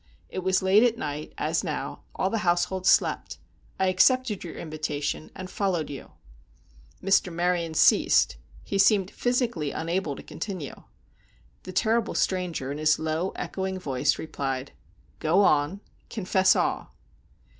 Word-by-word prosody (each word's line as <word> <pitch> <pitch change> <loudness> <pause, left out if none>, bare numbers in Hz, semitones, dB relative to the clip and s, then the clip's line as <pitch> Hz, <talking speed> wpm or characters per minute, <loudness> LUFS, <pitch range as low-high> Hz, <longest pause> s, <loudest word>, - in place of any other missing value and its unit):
It - - -4
was 190 +1 +1
late 190 +3 +5
at 235 -1 +3
night, 150 0 -5
as - - 0
now; - - -4
all 190 - 0
the 225 - 0
household 180 +1 0
slept. - - +2 0.4
I 190 - +3
accepted 210 +4 +3
your 170 - -7
invitation, 155 -2 -4
and 185 -1 -6
followed 180 -5 -1
you." 140 - -9 0.9
Mr. 195 -1 +3
Maryon 170 -1 0
ceased; - - +4 0.3
he 195 - -2
seemed 200 -1 +4
physically 240 - 0
unable 165 -1 -2
to - - -10
continue. 180 -5 -6 0.8
The - - -6
terrible 225 +3 +1
stranger, 175 -8 -1
in 145 - -5
his 155 0 +3
low, 160 +4 -1
echoing 190 0 -3
voice, 135 -8 0
replied: 135 -4 -4 0.5
"Go 165 +5 +3
on; 155 +4 +2 0.3
confess 190 -3 +2
all." - - -1
180 Hz, 135 wpm, -26 LUFS, 155-195 Hz, 0.9 s, late